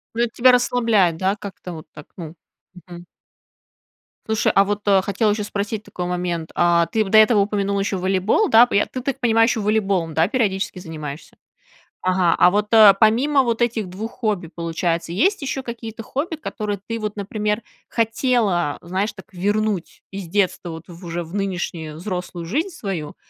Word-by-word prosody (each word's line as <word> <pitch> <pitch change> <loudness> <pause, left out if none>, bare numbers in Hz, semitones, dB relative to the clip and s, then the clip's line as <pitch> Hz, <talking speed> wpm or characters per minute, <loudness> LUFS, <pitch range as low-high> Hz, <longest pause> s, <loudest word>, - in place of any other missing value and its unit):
Ну, 235 - 0
это 240 - +1
тебя 255 +1 +5
расслабляет, 230 -8 +2
да, 190 +3 0
как-то 195 -3 -9
вот 155 - -10
так, 150 - -12
ну. 165 -1 -8 0.5
Мгм. 175 0 -10 1.2
Слушай, 220 0 +1
а 195 - +6
вот, 205 +1 -2
э, 195 -1 +5
хотела 205 +3 0
еще 210 0 -1
спросить 205 +1 -3
такой 180 - -6
момент: 175 -2 -3
а 170 -1 +3
ты, 220 - +1
п 195 - -7
до 220 - +5
этого 215 0 +6
упомянула 200 -1 0
еще 195 -1 -1
волейбол, 190 - +1
да, 230 +2 +8
п 245 - -4
Я, 205 - +3
ты, 255 - -6
так 270 0 -3
понимаю, 225 -1 +3
еще 235 - 0
волейболом, 200 -6 0
да, 160 +2 +3
периодически 195 -6 -1
занимаешься? 155 -3 -8 0.7
Ага, 185 -2 +2
а 180 - +7
вот, 210 +2 0
э, 215 -3 +9
помимо 265 +6 +4
вот 235 -1 -1
этих 225 -4 0
2 210 +5 -6
хобби, 210 -8 -2
получается, 170 0 -2
есть 370 - +1
еще 270 0 -3
какие-то 230 -2 -7
хобби, 285 +9 -3
которые 210 -9 -4
ты 230 0 -3
вот, 210 -1 -4
например, 210 +2 -2 0.3
хотела, 225 - 0
знаешь, 190 +5 -2
так 190 - -12
вернуть 205 0 -1
из 195 -2 -7
детства 185 -1 0
вот 160 0 -9
в, 175 +1 -12
уже 170 +1 -3
в 165 +5 -10
нынешнюю 175 -5 -3
взрослую 180 -2 -5
жизнь 310 - -1
свою, 195 - -5
200 Hz, 180 wpm, -21 LUFS, 175-225 Hz, 1.2 s, э